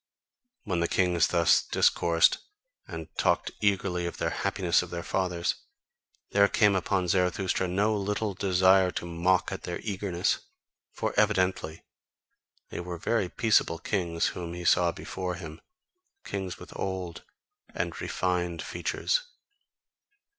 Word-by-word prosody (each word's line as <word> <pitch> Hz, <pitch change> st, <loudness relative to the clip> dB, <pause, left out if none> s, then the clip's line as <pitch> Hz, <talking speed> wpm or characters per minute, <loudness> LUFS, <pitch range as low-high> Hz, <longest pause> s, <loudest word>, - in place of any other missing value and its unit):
When 90 Hz, -5 st, -1 dB
the 85 Hz, -, +1 dB
kings 90 Hz, -2 st, +2 dB
thus 85 Hz, -2 st, +4 dB
discoursed 85 Hz, -1 st, +3 dB, 0.5 s
and -, -, -7 dB
talked -, -, +2 dB
eagerly 95 Hz, -4 st, +1 dB
of -, -, -6 dB
the -, -, -1 dB
happiness -, -, +1 dB
of -, -, -7 dB
their 85 Hz, -1 st, -5 dB
fathers, 90 Hz, -3 st, -1 dB, 0.8 s
there 100 Hz, 0 st, +5 dB
came 105 Hz, -1 st, +3 dB
upon 95 Hz, 0 st, 0 dB
Zarathustra 90 Hz, +1 st, +1 dB
no 100 Hz, +4 st, +1 dB
little 105 Hz, +1 st, -1 dB
desire 95 Hz, 0 st, +4 dB
to 90 Hz, -, -4 dB
mock 90 Hz, +2 st, +1 dB
at 95 Hz, -, -5 dB
their 90 Hz, -, -5 dB
eagerness: 95 Hz, -4 st, -1 dB, 0.5 s
for -, -, -3 dB
evidently 90 Hz, -4 st, +1 dB, 0.9 s
they -, -, -6 dB
were 90 Hz, 0 st, -5 dB
very 100 Hz, +1 st, 0 dB
peaceable 105 Hz, -6 st, +2 dB
kings 85 Hz, -1 st, -1 dB
whom 85 Hz, -1 st, -6 dB
he 90 Hz, 0 st, -7 dB
saw 85 Hz, 0 st, +4 dB
before 90 Hz, +1 st, -5 dB
him, 80 Hz, -3 st, -9 dB, 0.6 s
kings 95 Hz, -2 st, -4 dB
with -, -, -12 dB
old 90 Hz, -3 st, -4 dB, 0.5 s
and -, -, -3 dB
refined 90 Hz, -2 st, -1 dB
features. -, -, -1 dB
90 Hz, 130 wpm, -28 LUFS, 85-95 Hz, 0.9 s, there